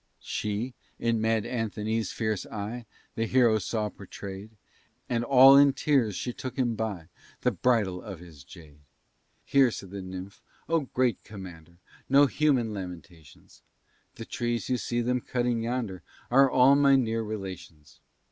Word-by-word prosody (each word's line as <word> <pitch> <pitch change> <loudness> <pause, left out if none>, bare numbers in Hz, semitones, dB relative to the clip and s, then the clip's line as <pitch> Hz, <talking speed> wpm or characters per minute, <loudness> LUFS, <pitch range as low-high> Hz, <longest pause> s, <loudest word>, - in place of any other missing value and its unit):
She, 105 +4 -3 0.2
in 115 -1 0
Mad 110 -1 +1
Anthony's 110 -3 -2
fierce 110 -3 -2
eye, 110 +3 -6 0.3
The 115 0 -2
hero 120 -3 +4
saw 105 +2 -2
portray'd, 100 +1 -9 0.6
And 120 -1 -1
all 135 +2 +8
in 140 0 +6
tears 130 -7 +1
she 125 - -4
took 130 +2 -7
him 125 -3 +1
by 105 -7 -4 0.3
The 125 - +2
bridle 100 -4 +1
of 100 -5 -8
his 80 -5 -14
jade. 75 0 -15 0.7
"Hear," 135 -2 +4
said 95 -4 -8
the 100 -1 -6
nymph, 95 +1 -8 0.3
"oh, 165 -5 0
great 125 -5 +1
commander! 85 -5 -11 0.3
No 140 +2 +6
human 135 -6 +1
lamentations; 90 -5 -10 0.5
The - - -8
trees 120 0 -3
you 125 - +1
see 120 +1 -1
them 125 +1 0
cutting 120 -2 -1
yonder, 115 -5 -3 0.3
Are 135 +2 +6
all 130 +2 +5
my 140 -1 +5
near 115 -3 +1
relations. 95 -8 -8
115 Hz, 145 wpm, -27 LUFS, 95-125 Hz, 0.7 s, all